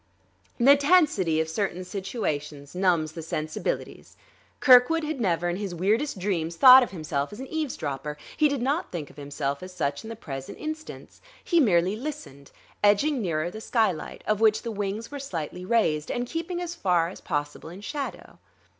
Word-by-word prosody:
The 275 +4 +7
tensity 280 - +3
of 160 - 0
certain 185 +1 -2
situations 155 - -4
numbs 180 -4 +1
the 165 +1 -7
sensibilities. 155 - -4 0.4
Kirkwood 260 +5 +6
had 305 -4 -3
never 175 -4 +1
in 175 +1 -1
his 195 -3 -4
weirdest 215 - 0
dreams 175 -4 -2
thought 255 +7 +10
of 245 - -1
himself 155 -5 -3
as 210 - -9
an 265 - -5
eavesdropper; 150 - -4 0.2
he 305 - +4
did 280 -4 -2
not 285 +6 -1
think 160 -5 -5
of - - -22
himself 140 -1 -3
as 185 0 -8
such 140 -4 -2
in 220 - -8
the 230 - -6
present 135 -10 -7
instance; 310 0 -7 0.2
he 340 - +2
merely 190 - +3
listened, 245 - -7 0.3
edging 235 +7 +3
nearer 170 -3 -1
the 220 - -8
skylight, 220 -9 -1
of 215 0 0
which 215 -1 +4
the 230 - -3
wings 205 +3 -4
were 285 - -5
slightly 180 - -5
raised, 160 -9 +1
and 245 - -2
keeping 330 +6 -4
as 350 -1 -4
far 180 - +1
as 185 - -11
possible 145 0 -4
in 180 +4 -10
shadow. 280 +5 -6
195 Hz, 175 wpm, -26 LUFS, 160-260 Hz, 0.4 s, thought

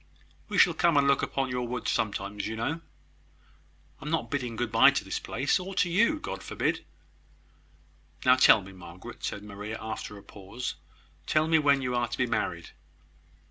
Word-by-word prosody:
"We - - -2
shall - - +6
come 170 -4 +3
and 140 0 +4
look 140 -1 +3
upon 135 -2 -2
your 125 -1 -2
woods 125 0 -2
sometimes, 100 -1 -2
you 110 - -4
know. 145 +9 -2 1.2
I - - -9
am - - -3
not 165 +1 -1
bidding 125 -5 -2
good 120 0 -2
bye 115 -1 +7
to - - -1
this - - -3
place, 135 +9 0
or 190 +1 -7
to 175 - +1
you. 230 - +3
God - - -6
forbid!" - - -2 1.4
"Now 125 0 +7
tell 130 -4 +6
me, 95 0 -11
Margaret," 90 -1 -11
said 100 - -4
Maria, 105 +1 -6
after 110 -1 -6
a 100 - -13
pause, 100 +6 -6 0.5
"tell 155 0 +2
me 160 0 +4
when 140 -2 +3
you 125 -1 -1
are 120 0 +1
to 120 - -5
be 125 - +2
married." 85 -7 -2
125 Hz, 185 wpm, -28 LUFS, 105-145 Hz, 1.4 s, bye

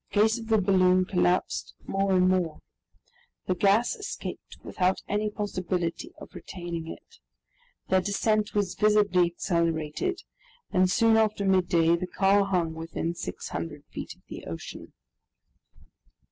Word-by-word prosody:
The 205 - +1
case 220 +2 +3
of 225 - -8
the 220 -1 +4
balloon 185 -2 +4
collapsed 180 -1 0
more 195 0 0
and 185 0 +4
more. 180 -4 0 0.9
The - - +1
gas 200 - +3
escaped 415 -3 -7
without 185 0 0
any 210 +1 0
possibility 185 -5 -3
of - - -12
retaining 170 -3 -6
it. - - -11 0.7
Their 190 0 +3
descent 210 +2 0
was 200 -3 +1
visibly 205 -4 +3
accelerated, 170 - -1 0.5
and 185 0 +3
soon 225 +2 +4
after 215 -2 +1
midday 175 -3 +3
the 180 +2 -4
car 195 +2 +3
hung 175 -4 0
within 165 +1 -4
600 155 -3 -6
feet - - -7
of - - -30
the - - -9
ocean. 80 0 -8
185 Hz, 130 wpm, -27 LUFS, 175-205 Hz, 0.9 s, the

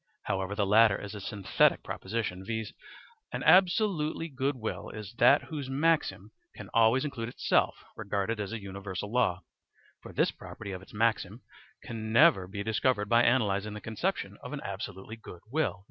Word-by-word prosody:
However, 95 +1 -2
the 105 -1 +1
latter 105 0 +5
is 100 0 -7
a 105 - -7
synthetic 100 0 +2
proposition; 95 -2 -4
viz., 110 +1 -4 0.6
an - - -4
absolutely 180 -4 +3
good 135 0 -1
will 110 -3 -5
is 105 -1 -8
that 135 +4 +6
whose 145 -4 -6
maxim 135 - +1 0.2
can - - -10
always 115 +4 +4
include 115 -6 -4
itself - - +1
regarded 105 +1 -2
as 100 -1 -3
a 115 - -4
universal 100 0 -6
law; 95 -7 +2 0.6
for - - -10
this - - +2
property 100 -2 -9
of 95 -1 -6
its - - -15
maxim 110 0 0 0.4
can 110 -2 -5
never 120 - +5
be 100 +2 -5
discovered 110 0 0
by 115 0 +5
analysing 105 -4 +1
the - - -5
conception 110 0 -3
of - - -8
an - - -4
absolutely 95 +4 -6
good 90 -6 -12
will. 150 -10 0
110 Hz, 165 wpm, -29 LUFS, 100-130 Hz, 0.6 s, that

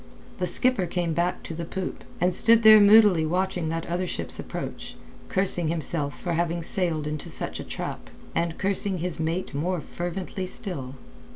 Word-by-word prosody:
The 180 - 0
skipper 250 -6 +1
came 170 -1 -1
back 175 +2 -1
to - - -6
the 170 +1 -5
poop, 185 +2 -5 0.2
and 180 +1 +2
stood 230 +4 +6
there 215 0 +9
moodily 205 -5 +6
watching 180 0 -1
that 165 +1 -3
other 180 +2 -2
ship's - - -5
approach, - - -6 0.3
cursing 185 -3 +2
himself 155 -3 -2
for 175 - -3
having 170 0 -1
sailed 165 -4 -1
into 150 -1 -4
such - - -2
a - - -5
trap, - - -6 0.2
and 170 -1 -1
cursing 195 0 +1
his 175 -1 -4
mate 165 +3 -2
more 175 +5 -1
fervently 180 +3 -5
still. 140 - -5
175 Hz, 170 wpm, -25 LUFS, 165-190 Hz, 0.3 s, there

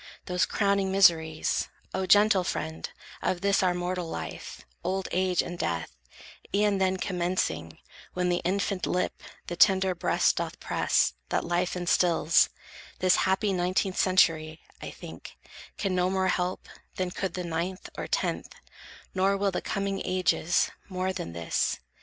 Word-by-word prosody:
Those 180 0 +1
crowning 200 -2 +1
miseries, 165 -5 +3 0.2
O 190 0 -1
gentle 205 0 +5
friend, 160 -2 -4 0.3
Of 180 -1 -1
this 200 0 +3
our 180 -1 +2
mortal 180 -1 -3
life, 80 - -7 0.2
old 190 0 -1
age 185 -1 +2
and 175 0 -7
death, 80 -6 -2 0.6
E'en 205 -1 +2
then 190 0 +2
commencing, 175 - -2 0.4
when 180 0 +1
the 175 0 +1
infant 190 0 -1
lip 180 - -1 0.2
The 175 - -4
tender 190 +1 +4
breast 175 - +1
doth - - -3
press, - - +1 0.2
that - - 0
life 175 +1 0
instils, 170 -2 +3 0.5
This 185 -1 +4
happy 195 +1 +1
nineteenth 185 +1 0
century, 160 -4 +3 0.2
I - - -5
think, - - -11 0.4
Can 195 -2 -1
no 180 0 +2
more 190 0 +1
help, 180 0 -1 0.3
than 185 -1 -2
could 190 -1 -3
the 180 - -3
ninth, 170 +3 -3
or - - -5
tenth, - - -2 0.6
Nor 195 +1 +2
will 200 0 +1
the 180 - -2
coming 195 -1 -2
ages, 185 -2 +1 0.2
more 185 0 -2
than 85 - -5
this. 85 -1 -1
185 Hz, 145 wpm, -28 LUFS, 175-190 Hz, 0.6 s, gentle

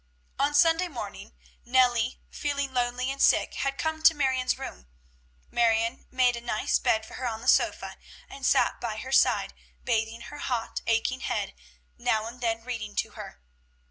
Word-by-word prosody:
On 285 +1 +1
Sunday 330 +4 +4
morning 225 - -8 0.3
Nellie, 245 -1 +2
feeling 280 -2 -2
lonely 250 +1 0
and 275 - -5
sick, - - +4
had 275 0 -2
come 315 0 -2
to 320 +1 +6
Marion's 260 -3 +1
room. 60 +1 -8 0.6
Marion 230 +1 +1
made 255 -1 +3
a 235 - -6
nice 235 -2 0
bed 220 0 +1
for - - -13
her 255 - -3
on 225 -1 -4
her - - -8
sofa, - - +2 0.3
and 275 - -11
sat - - +2
by 225 -3 -3
her 260 +4 -6
side - - +3 0.3
bathing 225 -1 -1
her 295 +4 -9
hot, 240 -5 -2
aching 230 +3 +1
head, 65 - -2 0.5
now 220 0 +1
and 240 +2 -9
then 225 -1 -1
reading 225 -4 -5
to - - -1
her. - - -10
245 Hz, 170 wpm, -27 LUFS, 225-270 Hz, 0.6 s, to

